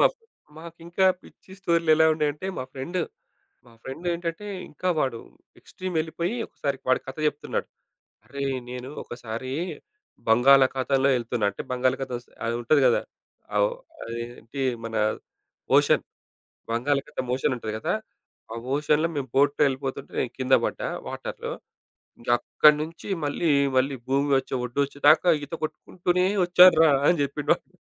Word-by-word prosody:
మాక్ - - +4 0.4
మాకింకా 170 +3 -2 0.2
పిచ్చి 190 - -17
స్టోరీ‌లేలా 165 -3 +3
ఉండేయంటే, 150 +2 -1
మా 130 - -3
ఫ్రెండ్, 155 +7 -4 0.7
మా 120 - -18
ఫ్రెండ్ 135 +8 -8
ఏంటంటే, 170 +4 -4 0.2
ఇంకా 185 +5 -2
వాడు 130 -5 -1 0.4
ఎక్స్‌ట్రీమ్ 185 -1 -7
ఎళ్ళిపోయి 170 +6 -3
ఒకసారి 140 -2 -3
వాడి 130 - +4
కథ 130 - -7
చెప్తున్నాడు. 150 0 -3 0.6
"అరేయ్! 140 -1 -3
నేను 125 +1 -6
ఒకసారి 120 +1 -6 0.8
బంగాళాఖాతంలో 135 +2 +4
ఎళ్తున్నా." 120 -2 -2
అంటే 100 - -7
బంగాళాఖాతం 130 0 0
స్ - - -39 0.2
అది 115 0 0
ఉంటది 140 +5 +3
గదా! 120 - +3 0.5
ఆహ్, - - +4
ఓహ్, - - -14 0.3
అది 115 0 -5 0.2
ఏంటి 120 +5 -7 0.2
మన 115 0 -5 0.8
ఓషన్ - - +3 0.7
బంగాళాఖాతం 130 +2 -1
ఓషన్ 130 +1 0
ఉంటది 110 -2 -5
గదా! - - -1 0.6
"ఆ - - -5 0.2
ఓషన్‌లో 150 +2 +2
మేము 135 -2 -3
బోట్‌లో 145 +2 +3
ఎళ్ళిపోతుంటే, 135 0 -5
నేను 125 - -2
కింద 130 0 +4
బడ్డా - - -3 0.2
వాటర్‌లో. - - -5 0.7
ఇంగా 120 +1 -1
అక్కడి 150 -1 +5
నుంచి 165 +5 -8 0.2
మళ్ళీ 150 +3 0 0.3
మళ్ళీ 135 +2 +1
భూమి 140 +2 +1
ఒచ్చే, - - -7
వొడ్డొచ్చే 140 +3 -2
దాకా 155 +4 +6 0.2
ఈత 145 - -7
కొట్టుకుంటూనే 180 +3 -1 0.2
వచ్చాను 180 +1 +7
రా!" 160 - +6 0.2
అని 175 - +4
చెప్పిండు 140 - -4
వాడు. - - -27
140 Hz, 140 wpm, -25 LUFS, 130-165 Hz, 0.8 s, వచ్చాను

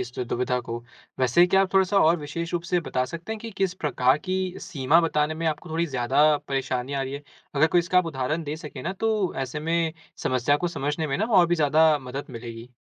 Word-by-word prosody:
इस 125 - -5
दुविधा 125 0 -1
को। 115 -1 -5 0.4
वैसे 130 +7 +4
क्या 190 +2 +4
आप 190 - -3
थोड़ा-सा 190 +1 +4
और 165 +2 +5
विशेष 165 +3 -5
रूप 175 -1 -1
से 175 +1 0
बता 130 -4 -1
सकते 170 +10 -6
है 220 - -5
कि 225 +1 -7
किस 190 -2 0
प्रकार 135 -5 +2
की 185 +3 -3 0.3
सीमा 150 +2 +2
बताने 155 -2 0
में 165 +1 -3
आपको 160 +2 -3
थोड़ी 165 +2 0
ज़्यादा 135 +3 +3
परेशानी 130 -1 -2
आ 135 -1 -1
रही 135 0 -5
है? 140 +1 -6 0.3
अगर 145 +3 +4
कोई 170 +2 +2
इसका 175 +1 +3
आप 180 - +1
उदाहरण 150 +2 -2
दे 150 +1 -4
सके 150 -5 -9
ना - - -2
तो 210 -2 0
ऐसे 135 +3 -5
में 165 +1 0 0.3
समस्या 130 +3 +2
को 175 +3 -1
समझने 150 0 -2
में 135 - -1
ना 215 - +1
और 200 -6 +5
भी 175 - +2
ज़्यादा 155 0 +4
मदद 135 +1 -6
मिलेगी। 115 0 -8
150 Hz, 230 wpm, -25 LUFS, 130-170 Hz, 0.4 s, और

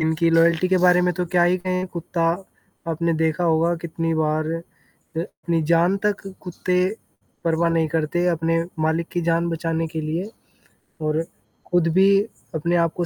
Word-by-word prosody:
इनकी 160 +1 +1
लॉयल्टी 165 +2 +4
के 185 - +3
बारे 180 0 +6
में 180 0 +2
तो 180 - -1
क्या 175 - +5
ही 180 +1 +3
कहें 185 0 -2
कुत्ता, 170 -1 -4 0.7
आपने 165 +1 0
देखा 160 +2 0
होगा 165 +1 +2
कितनी 165 0 -2
बार 155 0 0
अ, 165 0 -4 0.6
अपनी 170 -1 -2
जान 175 +4 +4
तक 205 -1 -1 0.2
कुत्ते 180 0 -1 0.7
परवाह 165 0 +2
नहीं 165 -1 +1
करते 165 +3 0
अपने 165 0 +1 0.2
मालिक 165 +1 0
की 175 - 0
जान 170 +1 +1
बचाने 165 0 -1
के 160 - -1
लिए। 165 +7 -3 0.7
और 155 +1 0 0.5
खुद 175 -2 +3
भी 195 +1 +6 0.5
अपने 170 +3 0
आप 165 - -3
को 175 - 0
165 Hz, 165 wpm, -22 LUFS, 160-175 Hz, 0.7 s, बारे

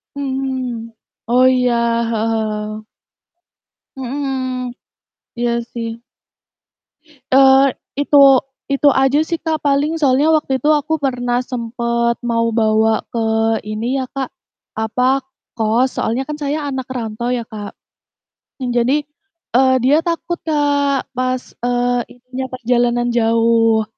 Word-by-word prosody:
Mhm, 260 -4 -3 0.3
oh 250 +2 +4
iya, 250 -1 +3 0.4
heeh 225 0 0
heeh. 215 -1 -3 1.1
Mhm, 260 -2 -3 0.7
iya 240 0 +1 0.2
sih. 230 0 -5 1.3
Eee, 270 0 +6 0.2
itu 290 0 +3 0.5
itu 275 +1 +3
aja 270 +2 +3
sih 335 -1 -2
Kak, 320 -2 -1
paling 285 +2 +2
soalnya 280 +1 +3
waktu 265 -3 -2
itu 295 - +1
aku 315 +3 -3
pernah 245 -2 0
sempet 235 0 -1
mau 230 -1 +1
bawa 220 0 +2
ke 235 - -2 0.5
ini 235 +5 -2
ya, - - -1
Kak, 265 -2 -2 0.5
apa, 220 +3 -1 0.5
kos, 225 +3 +2
soalnya 240 +4 0
kan 300 - -4
saya 290 +1 -2
anak 265 -2 -4
rantau 230 0 -4
ya, 240 -2 -1
Kak. 205 -1 -6 0.9
Mmm, 250 -2 -2
jadi, 245 +3 +2 0.6
eee, 260 0 +5
dia 275 +4 +5
takut 340 +1 -2
Kak, 285 -3 +1
pas, 255 0 -1 0.2
eee, 245 0 +1
intinya, 250 +1 -7
perjalanan 240 0 +1
jauh. 225 -1 +3
250 Hz, 120 wpm, -18 LUFS, 230-270 Hz, 1.3 s, Eee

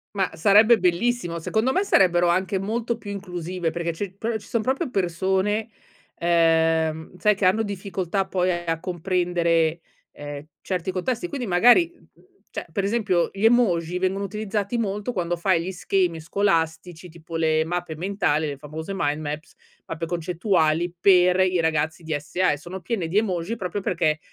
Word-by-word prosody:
Ma 195 -1 +1
sarebbe 215 +5 +5
bellissimo. 180 -1 0
Secondo 220 +9 0
me 380 - +2
sarebbero 175 - +4
anche 190 +2 +1
molto 230 +3 -2
più 205 -3 -8
inclusive, 180 -3 -4
perché 170 0 -3
ci 190 +2 -5
proprio 225 0 -2
ci - - -16
son 230 - 0
proprio 265 +5 -1
persone, 190 +3 0 0.5
ehm, 165 -1 +2
sai 210 +1 +3
che 195 - -1
hanno 205 +5 +4
difficoltà 195 -1 -2
poi 185 -1 0
a 170 -2 -2
comprendere, 175 -2 0 0.3
ehm, 145 0 -8 0.2
certi 185 -1 -2
contesti, 230 - -2
quindi 275 -6 -4
magari, 245 - +5
mhmm, - - -26 0.3
cioè - - -6
per 200 - -1
esempio 200 -5 +1
gli 195 +2 -5
emoji 180 -8 +3
vengono 190 +2 0
utilizzati 210 +2 -3
molto, 210 +1 -2
quando 175 -3 -1
fai 170 -1 +1
gli 185 +3 -4
schemi 180 -2 0
scolastici 165 -1 -1
tipo 165 0 -10
le 160 -1 +2
mappe 175 -2 -3
mentali, 175 -5 0
le 140 -2 -5
famose 155 +6 -7
mind 150 -3 0
maps, 150 +2 -6 0.3
mappe 165 +1 -4
concettuali 170 -1 0
per 180 -1 +5
i 185 -1 +2
ragazzi 160 +1 0
DSA 155 +4 0
e - - -4
sono 175 +5 -8
piene 180 -3 -2
di 195 - 0
emoji 195 0 0
proprio 195 +1 -3
perché 155 -4 0
180 Hz, 160 wpm, -24 LUFS, 165-200 Hz, 0.5 s, sarebbe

